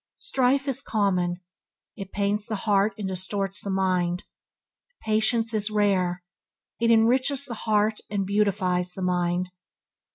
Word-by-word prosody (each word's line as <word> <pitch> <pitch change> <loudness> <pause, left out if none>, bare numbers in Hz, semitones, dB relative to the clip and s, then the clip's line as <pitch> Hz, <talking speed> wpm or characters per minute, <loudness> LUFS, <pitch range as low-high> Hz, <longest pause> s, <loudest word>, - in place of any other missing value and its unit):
Strife 270 -6 +1
is 270 - -1
common: 185 -4 0 0.5
it 195 -3 -8
pains 205 +1 -1
the 220 - -2
heart 205 0 +2
and 205 -2 -3
distorts 190 +1 -1
the 200 - -5
mind. 185 -2 0 0.8
Patience 220 +1 +1
is 215 -1 +1
rare, 190 -4 +1 0.6
it 230 0 +2
enriches 255 +5 +3
the 250 - -5 0.2
heart 215 0 +2
and 200 -2 -1
beautifies 190 -3 0
the 190 - -5
mind. 180 0 0
200 Hz, 130 wpm, -25 LUFS, 185-220 Hz, 0.8 s, enriches